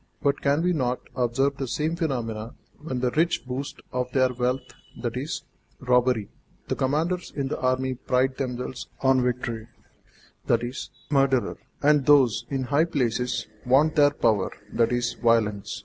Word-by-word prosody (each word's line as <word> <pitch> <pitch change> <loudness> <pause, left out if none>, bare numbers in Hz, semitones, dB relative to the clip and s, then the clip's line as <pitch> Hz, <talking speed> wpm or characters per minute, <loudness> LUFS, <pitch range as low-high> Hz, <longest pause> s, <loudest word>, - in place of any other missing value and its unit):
But 140 0 +1
can 145 +3 +2
we 180 0 +2
not 125 -5 0
observe 135 +3 +1
the 135 - -3
same 155 +6 -1
phenomenon 120 -9 -3 0.2
when 130 -5 -4
the 125 -1 +1
rich 165 -4 +1
boast 130 +2 -5
of 125 0 -1
their 130 -1 +3
wealth, 125 +2 -2 0.2
i.e., - - -3 0.5
robbery; 125 -4 +2 0.4
the - - +1
commanders 165 +7 0
in 140 -2 -1
the - - -3
army 130 0 +1
pride 130 +1 0
themselves 125 -1 -4
on 130 -1 +4
victories, 120 -2 -2 0.8
i.e., 120 +1 +2 0.4
murder; 135 -3 +2 0.3
and 145 -2 +4
those 125 -6 +5
in 135 -2 -1
high 145 +5 +2
places 125 -6 -1 0.2
vaunt 140 +5 +4
their 145 -1 +6
power, 110 -8 +1 0.3
i.e., 120 +1 +2 0.2
violence? 110 -4 +1
130 Hz, 145 wpm, -25 LUFS, 120-140 Hz, 0.8 s, their